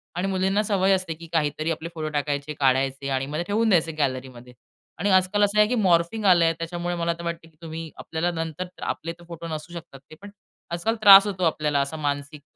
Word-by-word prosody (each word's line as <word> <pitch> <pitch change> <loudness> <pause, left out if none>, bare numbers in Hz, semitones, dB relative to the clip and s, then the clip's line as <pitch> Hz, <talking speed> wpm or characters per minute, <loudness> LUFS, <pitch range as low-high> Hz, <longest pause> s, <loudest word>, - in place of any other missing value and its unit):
आणि 180 +2 -1
मुलींना 195 +2 +1
सवय 195 -2 +1
असते 185 -3 -1
की 165 +1 -12
काहीतरी 155 0 0
आपले 165 +1 -5
फोटो 155 -1 -3
टाकायचे, 145 0 -2
काढायचे 135 0 +1
आणि 135 0 -1
मग 145 +2 -5
ते 170 - -1
ठेवून 220 +2 +1
द्यायचे 165 -4 +3
गॅलरीमध्ये. 130 -3 -3 0.5
आणि 200 +5 0
आजकाल 190 +2 +3
असं 205 +1 +1
आहे 210 - +6
की 250 - 0
मॉर्फिंग 190 0 +1
आलंय 170 -3 +5
त्याच्यामुळे 175 +1 -3
मला 170 0 -1
तर - - -7
वाटतं, 170 -1 -5
की 160 - -31
तुम्ही 165 -1 -7
आपल्याला 165 +2 -2
नंतर, 165 +2 -4
आपले 165 - -3
तर - - -14
फोटो 170 -1 -8
नसू 155 +1 -6
शकतात 160 -5 -10
ते. - - -10
पण 205 - -10 0.4
आजकाल 175 +7 -1
त्रास 200 -1 +10
होतो 190 -3 -3
आपल्याला 150 -3 +1
असं 140 +3 -4
मानसिक 145 0 -3
165 Hz, 210 wpm, -24 LUFS, 150-185 Hz, 0.5 s, त्रास